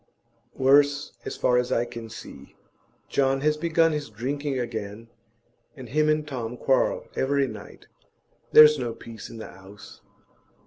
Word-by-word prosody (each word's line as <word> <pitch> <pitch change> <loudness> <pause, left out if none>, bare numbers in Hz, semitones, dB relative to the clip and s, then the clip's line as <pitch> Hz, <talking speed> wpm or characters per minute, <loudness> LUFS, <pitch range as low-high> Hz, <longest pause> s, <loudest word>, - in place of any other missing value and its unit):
'Worse, 145 +2 +3
as - - -5
far 125 0 +3
as 125 - -2
I 120 - +1
can 115 -1 -9
see. 70 -10 -11 0.5
John 135 0 +1
has 150 +1 +2
begun 165 +1 +2
his 150 -4 -4
drinking 135 +6 -3
again, 115 -2 -5 0.7
and 130 -5 -10
him 155 +4 +2
and 155 0 +1
Tom 125 -4 -5
quarrel - - +1
every 140 +1 +1
night; 110 -4 -11 0.7
there's 150 -1 +8
no 120 -2 -3
peace 115 -2 -10
in 115 - -10
the 110 - -7
'ouse. 95 +3 -14
130 Hz, 145 wpm, -25 LUFS, 115-150 Hz, 0.7 s, there's